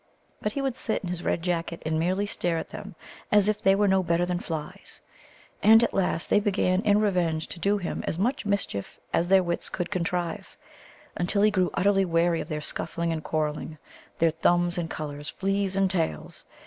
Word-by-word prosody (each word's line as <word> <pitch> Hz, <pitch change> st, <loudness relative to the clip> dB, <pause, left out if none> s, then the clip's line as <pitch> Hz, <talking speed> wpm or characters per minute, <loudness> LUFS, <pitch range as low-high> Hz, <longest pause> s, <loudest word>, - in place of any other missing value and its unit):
But 210 Hz, -, -2 dB
he 280 Hz, -, -2 dB
would 265 Hz, -3 st, -1 dB
sit 220 Hz, -5 st, -2 dB
in 180 Hz, -, -3 dB
his 175 Hz, -1 st, -4 dB
red 165 Hz, -, -1 dB
jacket 170 Hz, -1 st, -2 dB
and 155 Hz, 0 st, 0 dB
merely 185 Hz, +5 st, +1 dB
stare 175 Hz, -4 st, -1 dB
at -, -, -5 dB
them -, -, -8 dB, 0.4 s
as 205 Hz, -1 st, +5 dB
if 215 Hz, 0 st, 0 dB
they 195 Hz, 0 st, +5 dB
were 205 Hz, +1 st, +3 dB
no 190 Hz, 0 st, +4 dB
better 170 Hz, 0 st, +1 dB
than 175 Hz, 0 st, -1 dB
flies. 160 Hz, -4 st, -6 dB, 0.6 s
And 225 Hz, +2 st, +7 dB
at -, -, 0 dB
last 180 Hz, -3 st, 0 dB
they -, -, +4 dB
began 195 Hz, -2 st, +1 dB
in 205 Hz, -1 st, +3 dB
revenge 175 Hz, -6 st, +1 dB
to 170 Hz, -, -8 dB
do 200 Hz, +4 st, +2 dB
him 180 Hz, -4 st, -4 dB
as -, -, -1 dB
much 235 Hz, +9 st, 0 dB
mischief 200 Hz, -, -2 dB
as 170 Hz, -, +2 dB
their 190 Hz, 0 st, +5 dB
wits 170 Hz, -1 st, -2 dB
could 180 Hz, +1 st, -4 dB
contrive, 175 Hz, -2 st, -3 dB, 0.6 s
until 200 Hz, +4 st, +1 dB
he 215 Hz, -, +5 dB
grew 185 Hz, -3 st, +2 dB
utterly 195 Hz, 0 st, +3 dB
weary 170 Hz, -1 st, +2 dB
of -, -, -7 dB
their 155 Hz, -2 st, -3 dB
scuffling 170 Hz, +2 st, -2 dB
and 155 Hz, -1 st, -4 dB
quarrelling, 155 Hz, 0 st, -2 dB, 0.4 s
their 165 Hz, 0 st, +3 dB
thumbs 175 Hz, +2 st, +2 dB
and 165 Hz, -1 st, -3 dB
colours, 145 Hz, -1 st, -6 dB
fleas 195 Hz, 0 st, -1 dB
and 195 Hz, -1 st, +2 dB
tails. 160 Hz, -, -3 dB
180 Hz, 200 wpm, -26 LUFS, 165-200 Hz, 0.6 s, And